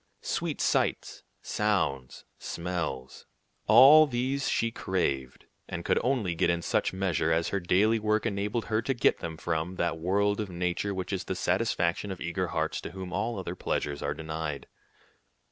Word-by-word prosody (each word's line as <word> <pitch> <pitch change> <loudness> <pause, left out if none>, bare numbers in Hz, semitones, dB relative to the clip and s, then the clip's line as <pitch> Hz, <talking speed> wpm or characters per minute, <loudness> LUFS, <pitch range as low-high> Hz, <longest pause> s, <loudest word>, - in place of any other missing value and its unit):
Sweet - - -2
sights, - - 0 0.2
sounds, 95 -12 -1
smells, 85 -7 -4 0.4
all 155 +4 +9
these 130 +2 -1
she 115 - +1
craved, 70 - -2 0.2
and 85 0 -6
could - - +2
get - - 0
only 120 -8 0
in 85 +1 +1
such - - +1
measure 90 -4 0
as 80 0 +1
her 100 - -1
daily 100 +5 +3
work 110 +1 +1
enabled 105 +1 -1
her 110 0 0
to 135 +3 -1
get 120 - +2
them 80 -1 -5
from 80 +2 -2
that 85 -2 -1
world 100 +4 +1
of 105 -2 -3
nature 90 +3 -2
which 95 +1 -4
is 95 - -3
the 95 - -3
satisfaction 90 0 0
of 95 - -5
eager 85 -1 -2
hearts - - -2
to - - -8
whom 95 -1 -7
all 110 +4 -1
other 90 -2 -4
pleasures 75 -5 -2
are 70 +1 -2
denied. 80 -3 -4
95 Hz, 165 wpm, -28 LUFS, 85-105 Hz, 0.4 s, all